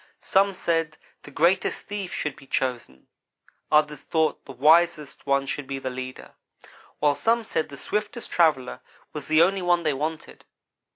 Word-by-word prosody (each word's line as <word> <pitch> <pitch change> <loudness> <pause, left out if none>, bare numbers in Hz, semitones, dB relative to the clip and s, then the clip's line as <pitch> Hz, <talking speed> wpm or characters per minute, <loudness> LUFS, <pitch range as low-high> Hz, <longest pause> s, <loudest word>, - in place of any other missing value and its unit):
Some 195 0 +2
said 165 -3 -1 0.2
the - - -12
greatest 170 +6 +1
thief 200 -3 -5
should 150 -2 -3
be 135 - -16
chosen. 120 - -3 0.7
Others 150 -2 +3
thought 160 -1 0
the - - -9
wisest 150 +2 +2
one 140 0 +2
should 140 0 -4
be 135 0 -4
the 130 -1 -4
leader; 130 0 -8 0.6
while 145 -1 +3
some 230 +9 +1
said 160 -7 -2
the 140 - -10
swiftest 210 +8 -4
traveller 150 - +2 0.3
was 150 -2 -7
the 155 +1 +5 0.2
one 175 -1 +2
they 155 -2 +1
wanted. 155 +3 -5
150 Hz, 155 wpm, -25 LUFS, 135-170 Hz, 0.7 s, the